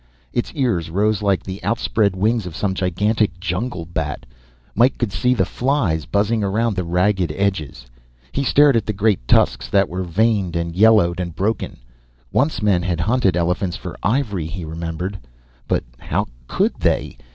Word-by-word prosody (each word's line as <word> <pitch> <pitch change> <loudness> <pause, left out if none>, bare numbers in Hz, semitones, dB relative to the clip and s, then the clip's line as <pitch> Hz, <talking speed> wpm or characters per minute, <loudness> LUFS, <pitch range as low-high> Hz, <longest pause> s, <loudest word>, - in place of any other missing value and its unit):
Its 120 - -1
ears 115 - 0
rose 105 +4 +1
like 100 -2 +1
the 95 +1 -7
outspread 110 -3 +1
wings 110 +1 +1
of 80 - -8
some 95 0 -1
gigantic 95 +1 0
jungle 90 +1 -3
bat. 80 -3 -4 0.5
Mike 120 +4 +3
could 120 -5 -1
see 125 +5 +1
the 95 -5 +2
flies 115 - 0
buzzing 105 +2 +1
around 110 +2 0
the 90 - -1
ragged 90 0 +1
edges. 95 -11 -2 0.5
He 140 - -1
stared 140 +1 +5
at 110 -2 0
the 105 - 0
great 100 - +1
tusks - - +3
that 100 -1 +3
were 90 +2 -3
veined 95 0 +1
and 85 0 -2
yellowed 100 -4 +4
and 85 -3 -4
broken 100 +6 -2 0.5
once 145 -4 +1
men 100 -4 +3
had 90 -2 -1
hunted 100 -3 +2
elephants 90 +1 0
for - - -7
ivory, 105 - 0
he 85 +1 -6
remembered. 85 +4 -4 0.5
But - - 0 0.2
how - - -1 0.2
could - - +1
they? - - 0
95 Hz, 165 wpm, -20 LUFS, 85-110 Hz, 0.5 s, stared